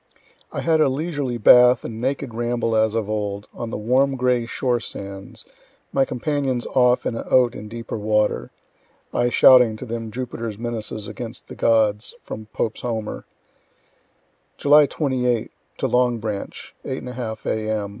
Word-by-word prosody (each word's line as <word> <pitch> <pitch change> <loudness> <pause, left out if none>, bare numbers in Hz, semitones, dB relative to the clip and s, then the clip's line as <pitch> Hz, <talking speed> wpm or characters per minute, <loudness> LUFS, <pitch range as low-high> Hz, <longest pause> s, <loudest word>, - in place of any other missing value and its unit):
I - - -3
had 160 -1 +2
a 145 - +4
leisurely 140 -3 -2
bath 125 +2 +6
and 115 0 -6
naked 135 -1 -2
ramble 120 0 -1
as 110 0 +2
of 110 -3 -1
old, 105 -1 -3
on 120 - -5
the - - -4
warm 130 +6 +2
gray 125 -2 +1
shore 125 -1 0
sands, 100 -3 -7 0.5
my 135 - +3
companions 130 -1 -2
off 125 -1 +3
in - - -1
a - - -3
oat 125 -2 +3
in 105 - -8
deeper 115 0 -6
water 105 -11 +1 0.6
(I 120 0 +2
shouting 125 -3 +6
to 130 - -7
them 115 -1 -5
Jupiter's 115 -2 -5
menaces 110 -2 -4
against 115 +3 -8
the - - -8
gods, 110 -2 +2
from 110 0 -8
Pope's 110 0 -3
Homer) 110 -3 -4 1.3
July 145 +1 +6
28 125 -6 -1 0.3
to - - 0
Long 125 -1 +2
Branch 105 -2 -6
8 130 - -4
1/2 120 -3 -6
A.M. 110 -2 -1
120 Hz, 155 wpm, -22 LUFS, 110-125 Hz, 1.3 s, bath